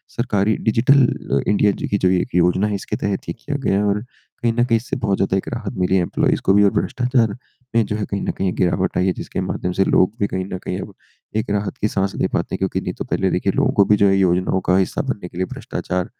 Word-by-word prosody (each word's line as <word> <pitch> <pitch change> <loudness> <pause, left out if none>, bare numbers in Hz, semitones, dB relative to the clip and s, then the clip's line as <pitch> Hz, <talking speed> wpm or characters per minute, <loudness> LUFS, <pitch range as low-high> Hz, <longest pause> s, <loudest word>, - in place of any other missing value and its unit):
सरकारी 110 -3 +1
डिजिटल 130 +6 +4
अ, 70 +2 -1
इंडिया 105 0 +3
जी - - -4
की 100 - +1
जो 90 - +2
ये 90 -1 +3
1 - - -6
योजना 90 +4 +3
है, 105 - -1
इसके 95 - -4
तहत 100 -1 -3
ये - - -1
किया 145 +4 -5
गया 95 - +2
है 105 - +1
और 105 +1 +1
कहीं 120 -1 -5
न 120 +1 +2
कहीं, 115 -2 +2
इससे 115 - -4
बहुत 100 -6 0
ज़्यादा 95 0 +1
एक - - -4
राहत 115 -2 -4
मिली 90 +1 +1
है 90 - +4
एम्प्लॉइज़ 85 - 0
को 95 - +5
भी, 105 0 +5
और 100 - +4
भ्रष्टाचार 125 -4 0 0.4
में, 115 -2 +4
जो 105 - -3
है, 105 - -2
कहीं 100 - -3
न - - -1
कहीं 95 -1 -2
गिरावट 90 - 0
आई 90 - +2
है, 95 - +2
जिसके - - -5
माध्यम 90 - -2
से - - +4
लोग 95 +3 +3
भी 100 - +1
कहीं 95 0 -3
न - - -2
कहीं 90 - -3
अब - - -9 0.4
एक 110 0 -2
राहत 105 0 -2
की 105 - +3
साँस 95 -1 -1
ले - - 0
पाते - - -2
हैं, - - -3
क्योंकि - - -1
नहीं - - -4
तो - - -6
पहले, - - 0
देखिए, - - 0
लोगों - - +2
को 100 - +4
भी, 105 - +4
जो 100 - +4
है, 95 - +4
योजनाओं 95 0 +2
का 90 - +5
हिस्सा 95 - 0
बनने 105 -10 -4
के 90 - -12
लिए 95 - 0
भ्रष्टाचार 90 -1 -3
100 Hz, 280 wpm, -20 LUFS, 95-110 Hz, 0.4 s, को